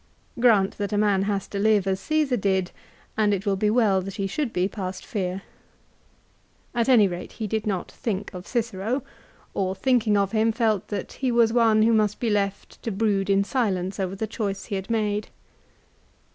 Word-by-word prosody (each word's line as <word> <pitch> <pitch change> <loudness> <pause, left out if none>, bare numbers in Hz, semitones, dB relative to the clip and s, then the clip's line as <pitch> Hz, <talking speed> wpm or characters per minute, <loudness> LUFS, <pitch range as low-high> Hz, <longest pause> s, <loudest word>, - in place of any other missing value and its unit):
Grant 215 -6 +3
that 205 0 -2
a - - +1
man 205 -2 +3
has 200 -1 -1
to 200 - -4
live 210 -2 +3
as 190 -1 0
Csesar 300 -7 0
did, 190 -2 +1 0.4
and 210 -2 +3
it 195 +2 -6
will 200 -1 +2
be 210 +2 +1
well 210 -4 +3
that 195 +1 -7
he 195 - -2
should 235 +6 -2
be 180 -2 +1
past 190 -2 -6
fear. 190 -2 -3 1.3
At 235 0 +1
any 225 -6 +6
rate 175 -1 -6
he 220 - -4
did 215 +1 -2
not 190 -3 -2
think 205 -4 -4
of 180 +1 -8
Cicero, 235 +1 -2 0.5
or 190 -1 -1
thinking 230 -3 +2
of 200 -1 +1
him 225 0 +2
felt 220 -4 +1
that 205 - -4
he 260 -2 -1
was 230 -1 +3
one 225 -2 +4
who 230 +1 +4
must 210 -2 +2
be 230 -3 0
left 200 -1 -2
to - - -3
brood 200 -2 0
in 195 0 +4
silence 200 -5 -1
over 190 0 -2
the 220 - -2
choice 200 -2 -4
he 200 - -4
had 190 +2 -5
made. 210 -2 -1
205 Hz, 195 wpm, -25 LUFS, 195-225 Hz, 1.3 s, any